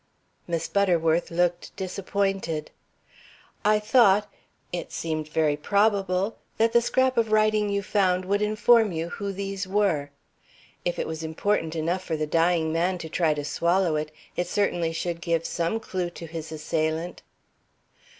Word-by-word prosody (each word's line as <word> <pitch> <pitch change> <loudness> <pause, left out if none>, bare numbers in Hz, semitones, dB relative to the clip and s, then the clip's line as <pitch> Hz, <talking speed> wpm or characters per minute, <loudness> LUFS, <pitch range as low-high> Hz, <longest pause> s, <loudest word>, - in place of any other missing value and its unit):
Miss 165 -1 -2
Butterworth 170 -4 +2
looked 175 +1 -1
disappointed. 190 -4 -2 0.9
"I 210 0 +4
thought 210 -2 +4 0.5
it 175 - -4
seemed 155 -2 -3
very 155 -1 +1
probable 200 +3 +1 0.2
that 225 +1 +3
the 235 - +6
scrap 260 +1 +1
of 225 -2 +2
writing 215 -1 +3
you 200 0 -1
found 185 -2 +1
would 200 +2 +1
inform 215 +1 +4
you 165 0 -3
who 200 +2 -4
these 195 0 -4
were. 185 -8 +1 0.7
If 175 - -1
it - - -1
was 160 0 -5
important 160 +1 -1
enough 170 +4 -1
for 160 - -2
the 155 - -1
dying 165 0 +2
man 180 +3 +1
to 165 -2 -7
try 160 -2 +1
to 145 -1 -4
swallow 170 +2 +1
it, 150 0 -2 0.2
it 175 - -1
certainly 175 -5 0
should 170 +1 -3
give 165 -1 0
some 170 +6 -1
clew 185 -5 -3
to 175 -1 -9
his 160 -1 -7
assailant." 160 +2 -2
180 Hz, 150 wpm, -26 LUFS, 165-200 Hz, 0.9 s, the